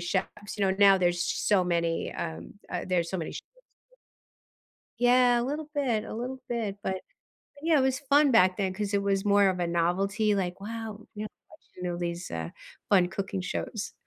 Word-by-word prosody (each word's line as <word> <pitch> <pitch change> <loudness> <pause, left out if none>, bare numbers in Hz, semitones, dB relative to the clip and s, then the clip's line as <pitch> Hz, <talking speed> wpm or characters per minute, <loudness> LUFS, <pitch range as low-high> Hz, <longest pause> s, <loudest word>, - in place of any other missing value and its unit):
Chefs. 195 +4 -3
You 200 - +1
know, 190 0 +1
now 200 -1 +7
there's 175 -1 +1
so 195 -3 +2
many, 170 -1 0
um, 80 +1 -6 0.2
uh 180 - -3
there's 175 -2 +1
so 190 - -2
many 160 - -4
shows - - -6 0.4
that - - -33 1.1
Yeah, 245 0 +5
a - - 0
little 295 +4 -3
bit, 240 -7 0
a - - -7
little 255 +2 -5
bit, 220 -4 -2
but 190 - 0
but 190 - -10 0.5
yeah, 310 -3 +5
it - - +3
was 260 0 +1
fun 285 0 +4
back, 185 -5 +5
then 190 -2 -1
'cause 205 +1 -3
it 200 - +2
was 195 -1 +1
more 200 -1 +4
of 180 -1 -3
a 175 - +1
novelty, 195 +5 +1
like, 185 0 -2
"Wow," 220 -1 -6
you 210 +1 -5
know - - -5 0.2
how - - -15
much - - -19 0.2
you 180 - -9
know 175 -1 -2
these, 175 0 -4
uh, 80 -1 -4 0.4
fun 180 -3 +4
cooking 190 0 -3
shows. 210 +3 -4
200 Hz, 210 wpm, -28 LUFS, 180-230 Hz, 1.1 s, now